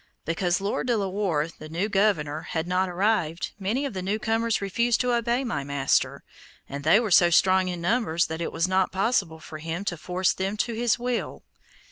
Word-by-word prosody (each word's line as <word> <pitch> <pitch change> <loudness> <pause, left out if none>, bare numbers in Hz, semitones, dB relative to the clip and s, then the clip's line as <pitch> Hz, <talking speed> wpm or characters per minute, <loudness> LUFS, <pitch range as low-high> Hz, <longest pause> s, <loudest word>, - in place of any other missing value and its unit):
Because 175 +2 0
Lord 200 +5 -2
De 240 -2 +2
la 200 -2 -1
Warr, 185 -6 0
the 155 - -9
new 175 +6 -1
governor, 190 -8 +1
had 160 0 -3
not 185 +1 +1
arrived, 180 -3 0
many 220 +9 -1
of 275 - -4
the 185 - -4
new 195 +4 -1
comers 225 +1 0
refused 235 +4 +1
to 250 -1 +1
obey 235 +2 +1
my 230 - -2
master, 140 -1 0 0.4
and 140 +1 -6
they 160 +8 +5
were 225 -4 -2
so 175 0 +6
strong 185 +2 +4
in 175 -2 -4
numbers 175 -4 +1
that 160 +1 -5
it 170 - -2
was 165 - 0
not 185 0 +1
possible 190 -5 0
for 155 0 -9
him 165 +5 -4
to 175 - -2
force 180 +3 0
them 195 +2 -3
to 235 +2 -1
his 235 +1 +1
will. 245 0 -3
190 Hz, 205 wpm, -26 LUFS, 165-220 Hz, 0.4 s, so